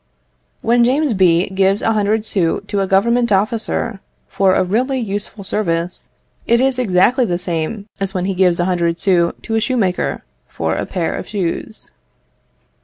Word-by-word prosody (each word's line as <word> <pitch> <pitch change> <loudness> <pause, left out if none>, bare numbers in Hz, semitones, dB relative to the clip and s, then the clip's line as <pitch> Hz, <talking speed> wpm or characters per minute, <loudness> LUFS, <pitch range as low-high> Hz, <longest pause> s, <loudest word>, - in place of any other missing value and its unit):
When 235 +1 +3
James 270 +2 +2
B. 180 -2 +3
gives 195 +1 +1
a 225 - +2
hundred 215 +1 0
sous 175 -6 0
to 205 - -2
a 195 - 0
Government 235 +5 +2
officer 215 +1 0 0.3
for 190 -1 +2
a - - +3
really 250 +8 0
useful 205 -1 -4
service, 175 -3 -2 0.4
it 235 0 +4
is 260 0 +1
exactly 240 +4 +3
the 180 -7 0
same 175 +4 -3
as 195 -1 -2
when 185 -1 -2
he 195 - -1
gives 180 -2 +2
a 175 - +2
hundred 170 -2 0
sous 175 -3 +2
to 225 - -4
a 225 - +3
shoemaker 220 -7 -1 0.2
for 80 -1 -2
a - - -3
pair 175 -4 -2
of - - -6
shoes. 205 +2 -4
195 Hz, 170 wpm, -18 LUFS, 180-225 Hz, 0.4 s, it